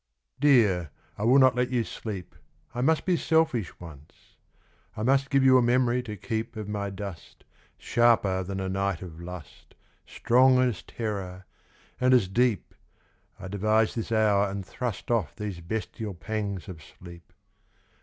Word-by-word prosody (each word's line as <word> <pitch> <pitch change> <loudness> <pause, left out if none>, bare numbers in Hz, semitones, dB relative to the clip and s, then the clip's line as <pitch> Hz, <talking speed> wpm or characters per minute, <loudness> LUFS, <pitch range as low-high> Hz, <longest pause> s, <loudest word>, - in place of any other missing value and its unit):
DEAR, 110 - +4 0.3
I 105 - -3
will 125 +4 +5
not 130 -2 +6
let 125 0 0
you 125 -2 0
sleep 100 -5 -7 0.4
I 120 - -3
must 160 +4 +2
be 185 - +2
selfish 160 - 0
once; 75 -4 -14 0.6
I 105 - -3
must 135 +3 +2
Give 135 -1 +3
you 130 -1 +6
a - - +3
memory 125 0 +2
to 105 -4 -7
keep 115 +4 -4
Of 110 -2 -6
my 100 -1 -3
dust 95 -4 -9 0.3
Sharper 115 -6 +2
than 95 +1 -5
a 95 - -3
night 95 -1 -2
of 85 -2 -10
lust 90 -3 -11 0.3
Strong 130 +2 +4
as 125 -6 +1
terror, 95 -5 -5 0.5
and 130 0 +4
as 115 -7 +3
deep 115 +2 0 0.7
I 95 - -7
devise 110 +3 +1
this 115 0 -5
hour 105 -2 +3
and 100 -1 -5
thrust 120 +1 -5
Off 105 -11 0
these 105 -4 -5
bestial 105 +2 -5
pangs 100 -1 -4
of 85 -4 -9
sleep. 85 +3 -14
105 Hz, 155 wpm, -27 LUFS, 95-125 Hz, 0.7 s, not